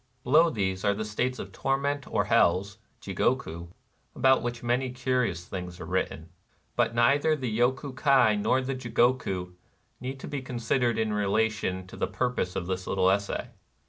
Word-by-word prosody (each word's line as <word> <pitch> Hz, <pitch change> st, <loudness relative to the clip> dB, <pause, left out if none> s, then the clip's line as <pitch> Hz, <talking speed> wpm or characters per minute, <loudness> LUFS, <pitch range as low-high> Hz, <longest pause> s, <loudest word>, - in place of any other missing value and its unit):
Below 155 Hz, +6 st, +5 dB
these 95 Hz, -6 st, -2 dB
are 100 Hz, -, +2 dB
the 110 Hz, +1 st, -3 dB
states 125 Hz, +4 st, -1 dB
of -, -, -7 dB
tor 135 Hz, 0 st, 0 dB
ment 140 Hz, 0 st, -2 dB
or -, -, +1 dB
hells 100 Hz, +4 st, +2 dB, 0.2 s
{Jigohit)^ 95 Hz, -4 st, -1 dB, 0.5 s
about 130 Hz, +1 st, +4 dB
which 120 Hz, 0 st, -4 dB
many 125 Hz, +2 st, 0 dB
curious 125 Hz, -8 st, -1 dB
things 90 Hz, -1 st, -6 dB
are 90 Hz, -, -6 dB
written; 85 Hz, -3 st, -2 dB, 0.5 s
but 115 Hz, -, +1 dB
neither 140 Hz, +6 st, +4 dB
the 125 Hz, -7 st, -3 dB
Yoku 130 Hz, +2 st, 0 dB
Kai 130 Hz, -6 st, +4 dB
nor 125 Hz, +5 st, +2 dB
the 135 Hz, +1 st, -2 dB
Jigoku 120 Hz, -7 st, 0 dB, 0.5 s
need 130 Hz, +1 st, -6 dB
be 140 Hz, -2 st, -4 dB
considered 120 Hz, -1 st, 0 dB
in 110 Hz, -1 st, 0 dB
relation 105 Hz, -2 st, 0 dB
to 90 Hz, -, -12 dB
the -, -, -1 dB
purpose 105 Hz, -3 st, -2 dB
of 90 Hz, -, -2 dB
this 95 Hz, 0 st, -3 dB
little 95 Hz, -1 st, +3 dB
essay. 100 Hz, +1 st, -2 dB
115 Hz, 165 wpm, -28 LUFS, 95-130 Hz, 0.5 s, Below